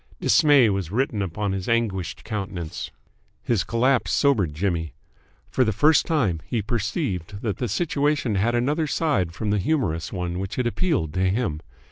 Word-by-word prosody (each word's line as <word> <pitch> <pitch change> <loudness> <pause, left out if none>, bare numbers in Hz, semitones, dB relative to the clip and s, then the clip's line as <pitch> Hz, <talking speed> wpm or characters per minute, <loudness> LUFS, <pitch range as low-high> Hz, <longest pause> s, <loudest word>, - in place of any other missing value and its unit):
Dismay 145 - +5
was 95 -5 -2
written 115 0 0
upon 100 +2 -2
his 95 +2 -3
anguished 100 -6 -1
countenance. 95 -7 -5 0.5
His 115 -6 +1
collapse 125 +2 +1
sobered 105 - +2
Jimmy. 85 -2 -2 0.6
For 130 - +3
the 110 - +1
first 145 +9 +4
time 110 - +1
he 115 -4 -1
perceived 105 - -3
that 105 -5 -1
the 125 - -2
situation 145 -7 0
had 110 +5 +1
another 145 +6 +1
side 140 - +1
than 105 +3 -2
the 105 - +2
humorous 95 - -1
one 90 -1 -3
which 95 +1 -4
had 125 - -1
appealed 120 - 0
to 95 0 +1
him. 95 -7 -1
105 Hz, 160 wpm, -24 LUFS, 95-130 Hz, 0.6 s, Dismay